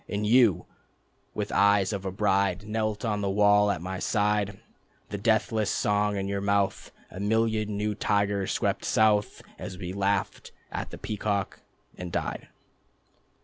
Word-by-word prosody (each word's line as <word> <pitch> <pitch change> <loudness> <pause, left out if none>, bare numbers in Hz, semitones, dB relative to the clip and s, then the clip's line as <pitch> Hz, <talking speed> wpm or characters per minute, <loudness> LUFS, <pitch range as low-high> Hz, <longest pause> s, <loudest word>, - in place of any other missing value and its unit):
And 105 +1 -2
you, 115 -4 +4 0.7
with - - -3
eyes 100 -1 +3
of 100 -1 -4
a 95 - -2
bride, 100 0 +1
Knelt 110 -1 -2
on 105 -2 -1
the 100 - -1
wall 105 +1 +4
at 85 -5 -2
my 95 0 -4
side, 105 -2 0 0.5
The 100 - -4
deathless 110 0 +1
song 105 0 +1
in 95 0 -2
your 100 0 -2
mouth... 100 -1 0 0.2
A 95 - -8
million 110 0 0
new 105 +1 -1
tigers 100 -2 0
swept - - -1
south... 105 -1 +2 0.2
As 90 - -7
we 90 -1 -5
laughed 100 0 -1 0.2
at - - -4
the - - -9
peacock, 100 -2 -3 0.4
and 90 -1 -6
died. - - -3
100 Hz, 150 wpm, -27 LUFS, 100-105 Hz, 0.7 s, you